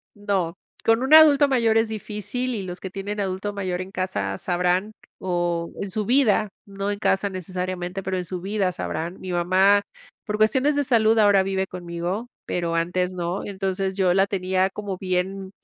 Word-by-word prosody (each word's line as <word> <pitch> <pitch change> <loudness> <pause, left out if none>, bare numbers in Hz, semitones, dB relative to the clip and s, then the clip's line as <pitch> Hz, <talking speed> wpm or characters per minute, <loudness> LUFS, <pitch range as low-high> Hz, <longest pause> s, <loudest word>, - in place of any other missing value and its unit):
no. 195 -4 -1 0.3
Con 225 +2 +3
un 280 +4 +6
adulto 295 -2 +8
mayor 230 -4 +2
es 225 0 0
difícil, 220 +4 -3
y 210 - -3
los 180 -1 -6
que 190 - -7
tienen 200 +2 -5
adulto 195 +1 -2
mayor 185 -2 -3
en 185 - -7
casa 100 - -3
sabrán. 180 +3 0 0.3
O, 175 -2 -1
en 200 - -3
su 210 +2 -2
vida, 230 -4 +3 0.2
no 195 +1 -3
en 205 - -4
casa 200 -1 +1
necesariamente, 185 0 -4
pero, 190 0 -2
en 180 - -3
su 180 0 -4
vida 195 -1 0
sabrán. 170 0 -4
Mi 185 - -6
mamá, 185 +3 +4 0.5
por 210 - -1
cuestiones 260 +7 +3
de 290 - +2
salud 225 -4 +3
ahora 205 -2 +5
vive 190 0 -1
conmigo, 180 +5 -4 0.2
pero 170 -1 -2
antes 180 +2 0
no. 175 +1 -3
Y - - -6
entonces, 190 0 -2
yo 185 -2 +3
la 195 +1 +3
tenía 185 -1 0
como 200 -1 -5
bien, 190 +1 -2
190 Hz, 185 wpm, -24 LUFS, 180-210 Hz, 0.5 s, adulto